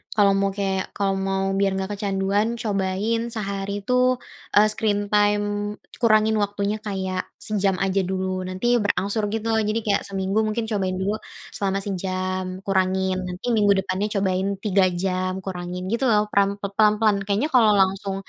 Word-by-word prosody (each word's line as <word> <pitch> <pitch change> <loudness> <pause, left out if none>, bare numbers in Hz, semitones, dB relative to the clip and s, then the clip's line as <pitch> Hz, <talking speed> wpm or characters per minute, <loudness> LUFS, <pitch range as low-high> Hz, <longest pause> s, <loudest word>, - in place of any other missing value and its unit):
kalau 205 -2 +5
mau 195 - +2
kayak 195 -1 -2
kalau 195 -1 0
mau 195 0 0
biar 195 -1 +2
nggak 190 +1 -3
kecanduan, 200 +1 0
cobain 200 +2 0
sehari 200 -2 -3
tuh, 250 0 +3 0.5
eee, 210 +1 +7
screen 210 -1 +1
time 205 0 +1 0.3
kurangin 220 -1 +4
waktunya 205 +1 -1
kayak 190 -3 -3 0.2
sejam 200 -2 +1
aja 195 +1 +1
dulu, 185 -1 -2
nanti 240 +7 +1
berangsur 205 +1 0
gitu 225 0 -2
loh, 220 - +2
jadi 215 +2 0
kayak 200 -2 +2
seminggu 195 +1 -1
mungkin 220 +2 -1
cobain 190 -3 0
dulu 205 +3 -1 0.4
selama 195 -1 -1
sejam 185 -1 -3
kurangin, 190 -1 +1
nanti 180 0 -7
minggu 210 -3 +4
depannya 190 +2 -1
cobain 190 -1 +1 0.2
3 200 -2 +3 0.2
jam 185 -1 0
kurangin 180 -1 -5
gitu 235 +3 0
loh, 210 -2 +2
perang 200 0 +2
pe 200 - -2
pelan-pelan. 210 0 +3
Kayaknya 210 +9 +1
kalau 230 -5 +5
langsung 195 0 +1
200 Hz, 155 wpm, -23 LUFS, 190-210 Hz, 0.5 s, eee